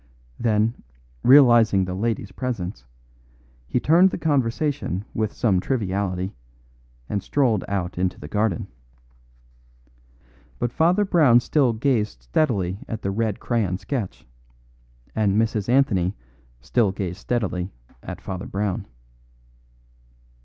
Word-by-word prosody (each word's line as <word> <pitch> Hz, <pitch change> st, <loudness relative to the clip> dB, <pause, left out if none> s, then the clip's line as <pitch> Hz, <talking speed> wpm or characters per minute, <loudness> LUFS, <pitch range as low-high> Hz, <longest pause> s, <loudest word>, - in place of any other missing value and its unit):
Then, 110 Hz, 0 st, +1 dB, 0.4 s
realising 120 Hz, -8 st, +6 dB
the 90 Hz, -, -4 dB
lady's 110 Hz, 0 st, -2 dB
presence, 95 Hz, -, -4 dB, 0.8 s
he 125 Hz, -, 0 dB
turned 170 Hz, +8 st, +5 dB
the -, -, -4 dB
conversation 140 Hz, -, -1 dB
with 110 Hz, -1 st, -1 dB
some 100 Hz, -6 st, +1 dB
triviality, 95 Hz, -5 st, -2 dB, 0.7 s
and 100 Hz, -, -2 dB
strolled 120 Hz, -7 st, +1 dB
out 95 Hz, -3 st, -3 dB
into 90 Hz, 0 st, -1 dB
the 75 Hz, -, -8 dB
garden. 105 Hz, 0 st, 0 dB, 1.9 s
But 120 Hz, -1 st, -1 dB
Father 180 Hz, +6 st, +3 dB
Brown 150 Hz, -11 st, +5 dB
still 130 Hz, -1 st, +2 dB
gazed 110 Hz, -, -1 dB
steadily 95 Hz, -, 0 dB
at 110 Hz, -1 st, -5 dB
the 100 Hz, -, -1 dB
red 110 Hz, 0 st, -1 dB
crayon 105 Hz, -7 st, 0 dB
sketch; 115 Hz, -4 st, -5 dB, 0.9 s
and 105 Hz, -1 st, +2 dB
Mrs. 110 Hz, -2 st, 0 dB
Anthony 105 Hz, -8 st, +2 dB, 0.5 s
still 110 Hz, -, +1 dB
gazed 95 Hz, -1 st, -4 dB
steadily 95 Hz, -7 st, -2 dB, 0.3 s
at -, -, -8 dB
Father 95 Hz, 0 st, -6 dB
Brown. 100 Hz, -1 st, -2 dB
110 Hz, 110 wpm, -23 LUFS, 95-125 Hz, 1.9 s, realising